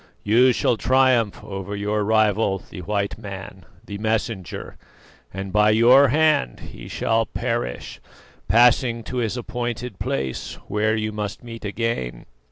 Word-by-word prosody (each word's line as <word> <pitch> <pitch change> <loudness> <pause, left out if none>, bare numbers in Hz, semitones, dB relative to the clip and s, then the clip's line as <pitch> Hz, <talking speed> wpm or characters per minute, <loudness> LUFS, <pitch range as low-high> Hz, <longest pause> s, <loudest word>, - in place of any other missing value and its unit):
You 120 +5 +5
shall 120 -1 +1
triumph 130 -4 +2
over 95 0 -6
your 105 +1 -1
rival, 110 -2 +2
the 90 - -9
white 100 +2 -2
man, 95 -3 -9 0.2
the 100 0 -7
messenger; 110 -3 -3 0.6
and 95 0 -6
by 105 0 +4
your 120 +6 +6
hand 150 - +2
he - - -10
shall 115 -1 0
perish, - - -3 0.5
passing 120 +2 +4
to 125 - -6
his 120 0 -1
appointed 120 -2 -4
place 65 -2 -3
where 105 +2 +1
you 110 0 -2
must 105 0 -5
meet 115 -1 -9
again. 100 - -3
110 Hz, 135 wpm, -23 LUFS, 100-120 Hz, 0.6 s, your